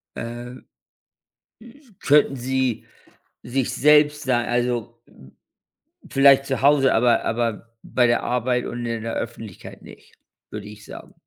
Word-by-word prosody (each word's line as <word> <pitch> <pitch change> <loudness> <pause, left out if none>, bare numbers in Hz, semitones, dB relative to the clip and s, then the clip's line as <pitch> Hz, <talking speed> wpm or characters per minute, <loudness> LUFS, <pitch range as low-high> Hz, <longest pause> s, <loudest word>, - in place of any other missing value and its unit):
äh“ 120 +1 -7 1.5
„Könnten 145 -1 +3
sie 130 -1 -2 0.6
sich 125 0 -2
selbst 150 +1 +4
sei 125 -4 0
also 120 -1 -2 1.1
vielleicht 135 0 +5
zu 135 -2 -3
Hause, 140 -1 +4
aber 120 +1 +2
aber 115 0 -3
bei 125 - +1
der 120 - +1
Arbeit 125 0 -1
und 120 0 -5
in 115 -1 -3
der 115 - -4
Öffentlichkeit 115 -4 -8
nicht“, - - -16 0.4
würde 105 -1 -7
ich 105 0 -13
sagen. - - -12
120 Hz, 125 wpm, -22 LUFS, 115-135 Hz, 1.5 s, vielleicht